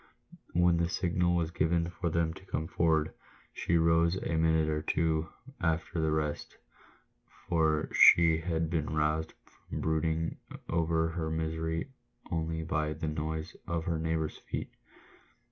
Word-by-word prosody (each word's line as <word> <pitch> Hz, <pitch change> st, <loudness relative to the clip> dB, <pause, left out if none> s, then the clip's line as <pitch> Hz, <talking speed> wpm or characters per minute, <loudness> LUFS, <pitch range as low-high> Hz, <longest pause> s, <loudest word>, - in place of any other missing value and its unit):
"When 85 Hz, 0 st, +4 dB
the 85 Hz, 0 st, +1 dB
signal 90 Hz, -1 st, +1 dB
was 85 Hz, -1 st, 0 dB
given 85 Hz, +1 st, +1 dB
for 85 Hz, -1 st, -2 dB
them 80 Hz, 0 st, 0 dB
to 95 Hz, -, -14 dB
come 80 Hz, -, -2 dB
forward, 80 Hz, -2 st, +1 dB, 0.4 s
she 85 Hz, -, +1 dB
rose 85 Hz, +1 st, +3 dB
a 85 Hz, -3 st, -2 dB
minute 80 Hz, -1 st, +3 dB
or 75 Hz, 0 st, 0 dB
two 80 Hz, 0 st, 0 dB, 0.3 s
after 80 Hz, 0 st, 0 dB
the 80 Hz, -, +1 dB
rest, 75 Hz, -1 st, -2 dB, 0.9 s
for 80 Hz, -2 st, +2 dB
she 85 Hz, -1 st, +7 dB
had 80 Hz, -1 st, -1 dB
been 80 Hz, -3 st, -1 dB
roused 75 Hz, +1 st, 0 dB, 0.4 s
from -, -, -3 dB
brooding 80 Hz, +1 st, 0 dB, 0.3 s
over 80 Hz, 0 st, +1 dB
her 80 Hz, -1 st, -3 dB
misery 80 Hz, +5 st, -2 dB, 0.4 s
only 80 Hz, -1 st, -2 dB
by 75 Hz, -2 st, -1 dB
the 80 Hz, +1 st, -4 dB
noise 80 Hz, +1 st, -3 dB
of 85 Hz, -1 st, -1 dB
her 85 Hz, -3 st, -1 dB
neighbours' 80 Hz, -1 st, -2 dB
feet. -, -, -5 dB
80 Hz, 145 wpm, -30 LUFS, 80-85 Hz, 0.9 s, she